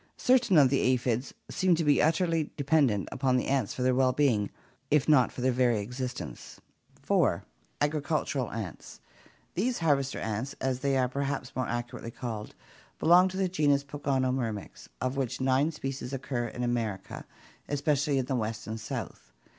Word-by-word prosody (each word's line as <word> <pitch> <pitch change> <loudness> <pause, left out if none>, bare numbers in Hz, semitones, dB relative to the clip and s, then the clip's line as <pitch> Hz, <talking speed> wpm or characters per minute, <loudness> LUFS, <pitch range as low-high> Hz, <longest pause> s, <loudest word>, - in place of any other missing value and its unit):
Certain 250 -8 +4
of 135 -4 +6
the 135 - +3
aphids 125 0 +1 0.2
seem 185 -2 +2
to 165 - -1
be 145 -2 +4
utterly 165 0 +1
dependent 140 -8 +2
upon 130 -2 +1
the - - 0
ants 130 -6 0
for 125 - -2
their 130 0 +3
well 130 0 +3
being 120 -9 +2 0.4
if 150 -2 +3
not 145 -5 +5
for - - -7
their 130 +1 +3
very 125 -2 +2
existence. 125 +4 -6 0.4
4. - - +2 0.4
Agricultural 145 -3 0
ants. 105 -7 -7 0.5
These 235 +7 0
harvester 140 -5 +1
ants, 110 +5 -3
as 130 -1 -1
they 140 0 +1
are 130 -1 +2
perhaps 140 0 -3
more 130 - -1
accurately 120 0 -4
called, 115 -3 -6 0.4
belong 180 +3 +6
to 190 0 -5
the 190 -1 +1
genus 145 -6 +2
Pogonomyrmex, 130 -6 -2
of 130 +1 -2
which 130 -4 -2
nine 130 +3 +2
species 135 -3 -5
occur 130 -3 -2
in 125 +2 -5
America, 115 -5 -2 0.5
especially 145 0 +1
in 130 - 0
the 130 - -1
West 110 -2 -3
and 110 +1 -5
South. 85 - -6
130 Hz, 160 wpm, -29 LUFS, 120-145 Hz, 0.5 s, of